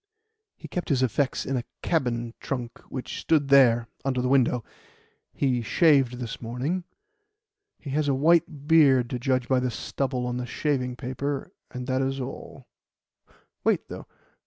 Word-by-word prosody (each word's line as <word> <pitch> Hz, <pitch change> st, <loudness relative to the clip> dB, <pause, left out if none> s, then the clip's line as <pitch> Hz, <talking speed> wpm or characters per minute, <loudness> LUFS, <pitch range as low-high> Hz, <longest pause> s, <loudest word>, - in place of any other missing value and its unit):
He -, -, -10 dB
kept 180 Hz, -, -4 dB
his 130 Hz, -3 st, +2 dB
effects 130 Hz, +3 st, 0 dB
in 135 Hz, -, -1 dB
a 120 Hz, -, -2 dB, 0.2 s
cabin 120 Hz, -7 st, 0 dB
trunk 125 Hz, -3 st, -5 dB
which 130 Hz, -, -5 dB
stood 150 Hz, -4 st, +2 dB
there 120 Hz, -4 st, +5 dB, 0.2 s
under 130 Hz, -2 st, 0 dB
the 125 Hz, -, 0 dB
window. 125 Hz, -3 st, +3 dB, 0.7 s
He 125 Hz, -3 st, 0 dB
shaved 135 Hz, +2 st, +4 dB
this 120 Hz, -3 st, -6 dB
morning. 130 Hz, +10 st, -3 dB, 0.9 s
He 140 Hz, -, -8 dB
has 150 Hz, +1 st, 0 dB
a 140 Hz, -, +2 dB
white 150 Hz, -1 st, +2 dB
beard, 135 Hz, -7 st, +5 dB
to 125 Hz, -, -2 dB
judge 130 Hz, 0 st, 0 dB
by 130 Hz, -1 st, +3 dB
the 125 Hz, 0 st, 0 dB
stubble 130 Hz, +1 st, -3 dB
on 125 Hz, 0 st, -2 dB
the 125 Hz, 0 st, -4 dB
shaving 125 Hz, -2 st, -1 dB
paper, 135 Hz, +2 st, -4 dB, 0.2 s
and 125 Hz, 0 st, -6 dB
that 130 Hz, 0 st, 0 dB
is 135 Hz, 0 st, -1 dB
all. 125 Hz, -, -7 dB, 1.0 s
Wait, -, -, +1 dB
though. -, -, -8 dB
130 Hz, 160 wpm, -26 LUFS, 125-140 Hz, 1.0 s, there